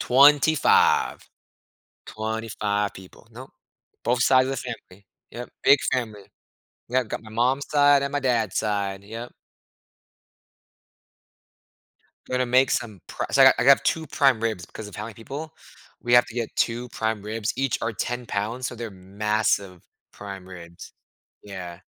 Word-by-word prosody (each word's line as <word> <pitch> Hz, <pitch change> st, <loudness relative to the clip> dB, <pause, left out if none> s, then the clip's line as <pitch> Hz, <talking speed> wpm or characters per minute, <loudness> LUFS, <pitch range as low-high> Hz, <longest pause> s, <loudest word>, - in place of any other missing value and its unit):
25. 145 Hz, +4 st, +4 dB, 0.9 s
25 110 Hz, -2 st, -2 dB
people. 95 Hz, +4 st, -15 dB
Nope. 125 Hz, +4 st, -11 dB, 0.5 s
Both 125 Hz, +1 st, +1 dB
sides 130 Hz, 0 st, +4 dB
of -, -, -1 dB
the -, -, -3 dB, 0.3 s
family. 95 Hz, +1 st, -20 dB, 0.2 s
Yep, 120 Hz, +1 st, -8 dB
big 140 Hz, -, +6 dB
family. 110 Hz, -5 st, -3 dB, 0.7 s
Yeah, 130 Hz, +2 st, +2 dB
I've 110 Hz, -, -10 dB
got -, -, -4 dB
my 110 Hz, -, -12 dB
mom's 130 Hz, +5 st, +1 dB
side 145 Hz, -1 st, +4 dB
and 140 Hz, -, -3 dB
my 145 Hz, -, 0 dB
dad's 115 Hz, -7 st, 0 dB
side, 100 Hz, -2 st, -2 dB
yep. 115 Hz, +3 st, -8 dB, 3.0 s
Gonna 130 Hz, 0 st, +1 dB
make 130 Hz, +2 st, +3 dB
some 110 Hz, -6 st, -3 dB
pri -, -, -4 dB
so 135 Hz, -, +5 dB
I -, -, +9 dB
got 130 Hz, -, +7 dB
I 120 Hz, -, +1 dB
got 140 Hz, 0 st, +6 dB
2 160 Hz, -, 0 dB
prime 135 Hz, -5 st, +3 dB
ribs 110 Hz, -6 st, -2 dB
because 110 Hz, -2 st, -9 dB
of -, -, -12 dB
how 105 Hz, -, -5 dB
many 110 Hz, -1 st, -8 dB
people. 145 Hz, +7 st, -8 dB, 0.5 s
We 120 Hz, -, -2 dB
have 120 Hz, -, +6 dB
to 120 Hz, -, -12 dB
get 115 Hz, -2 st, -2 dB
2 120 Hz, +1 st, -1 dB
prime 110 Hz, -2 st, -3 dB
ribs. 110 Hz, +1 st, -3 dB
Each 135 Hz, -2 st, 0 dB
are 115 Hz, 0 st, -2 dB
10 120 Hz, +4 st, -4 dB
pounds, 115 Hz, +6 st, -3 dB
so 125 Hz, -, -6 dB
they're 115 Hz, -2 st, -6 dB
massive 100 Hz, -1 st, -1 dB, 0.3 s
prime 100 Hz, -2 st, -9 dB
ribs. 85 Hz, -2 st, -11 dB, 0.5 s
Yeah. 90 Hz, -4 st, -8 dB
115 Hz, 155 wpm, -24 LUFS, 105-130 Hz, 3.0 s, I